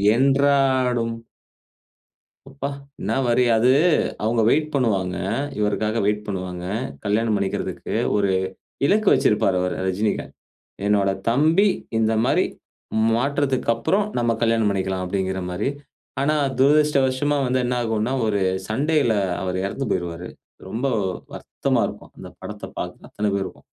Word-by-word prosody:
என்றாடும். 130 -3 +2 1.3
அப்ப, 140 0 -7 0.4
என்ன - - -1
வரி. 120 +1 +3
அது 125 +3 +4 0.5
அவுங்க 115 +1 +2
வெயிட் 155 +1 +2
பண்ணுவாங்க. 100 -9 0 0.4
இவருக்காக 105 +2 0
வெயிட் 105 0 0
பண்ணுவாங்க. 90 -3 -4 0.4
கல்யாணம் 110 +1 +1
பண்ணிக்குறதுக்கு. 100 -1 -3 0.2
ஒரு 100 -1 +2 0.6
இலக்கு 210 +3 +3
வைச்சுருப்பாரு 105 -8 +2
அவரு 90 0 -1
ரஜினிகாந்த். 105 +3 -1 0.5
என்னோட 100 -1 +3 0.2
தம்பி 160 - +4 0.3
இந்த 110 0 +2
மாரி - - +2 0.7
மாற்றத்துக்கப்புறம் 135 - +1
நம்ம 120 -1 +2
கல்யாணம் 115 -2 +2
பண்ணிக்கலாம், 95 -1 -1
அப்டீங்குற 95 0 -2
மாரி. 100 +9 -1 0.5
ஆனா, 150 +2 +2 0.2
துரதிஷ்டவஷமா 145 -1 +3
வந்து 130 +1 +1
என்ன 125 0 0
ஆகும்னா, 110 +2 -1
ஒரு 100 -2 0 0.3
சண்டைல 140 +1 +1 0.3
அவரு 95 -1 -2
இறந்து 135 +7 -3
போய்ருவாரு. 90 -1 -3 0.4
ரொம்ப 115 +8 -2 0.5
வருத்தமா - - -1
இருக்கும், - - -10
அந்த - - -9
படத்த - - -7
பாக்குற - - -6
அத்தன 105 -1 -1
பேருக்கும். 95 - -5
115 Hz, 115 wpm, -22 LUFS, 100-135 Hz, 1.3 s, அது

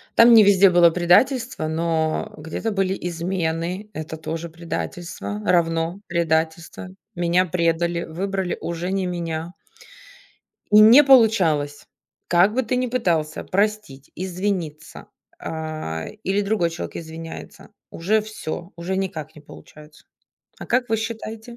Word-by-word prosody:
Там 235 +1 +7
не 225 -2 +9
везде 200 -1 +6
было 175 -1 +6
предательство, 180 - +2
но 160 0 -1
где-то 160 +8 -4
были 195 -1 0
измены, 170 +2 -3
это 155 0 -6
тоже 165 +1 -5
предательство, 165 - -6
равно 165 +1 +1
предательство. 165 +1 -1 0.3
Меня 175 +1 +2
предали, 170 0 0
выбрали 190 +2 -3
уже 170 +2 -4
не 195 -1 -1
меня. 170 -1 -4 1.2
И 210 +1 +7
не 230 +7 +9
получалось. 190 - +3 0.4
Как 180 +4 +4
бы 260 - +1
ты 250 +1 -1
ни 250 0 0
пытался 170 -11 -1
простить, 200 -9 -2
извиниться. 180 -4 -4 0.3
А, 155 - -5 0.2
или 195 +1 0
другой 200 -4 0
человек 165 - -7
извиняется, 165 0 -9 0.2
уже 205 +6 +1
всё, 190 -4 -7
уже 175 +3 -3
никак 160 -6 -4
не 150 - -13
получается. 150 0 -15 0.5
А - - -8
как 250 0 +1
вы 225 - +1
считаете? 225 +1 -6
175 Hz, 125 wpm, -22 LUFS, 160-205 Hz, 1.2 s, не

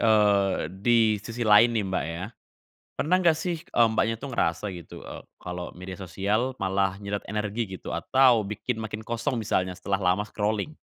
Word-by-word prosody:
eee, 105 -5 +3
di 110 -2 +3
sisi 115 +3 -4
lain 115 +2 +6
nih, 105 - +1
Mbak, 95 -1 -1
ya, 85 +3 -4 0.7
pernah 175 +5 +1
enggak 175 -3 +4
sih, 170 +2 -2
eee, 120 -1 +3
Mbaknya 110 0 0
itu 140 - -6
ngerasa 105 -5 0
gitu, 85 - -10
eee, - - -8 0.2
kalo 90 0 -6
media 90 +1 -8
sosial 100 +6 -1
malah 95 0 0
nyedot 100 0 -4
energi 105 +2 -2 0.2
gitu? - - -9
Atau 120 +5 +4
bikin 110 +4 -3
makin 110 -1 -5
kosong 115 +2 -2
misalnya 95 -4 0
setelah 95 +2 -2
lama 105 +3 -3
scrolling? 110 +8 -2
105 Hz, 170 wpm, -26 LUFS, 95-115 Hz, 0.7 s, lain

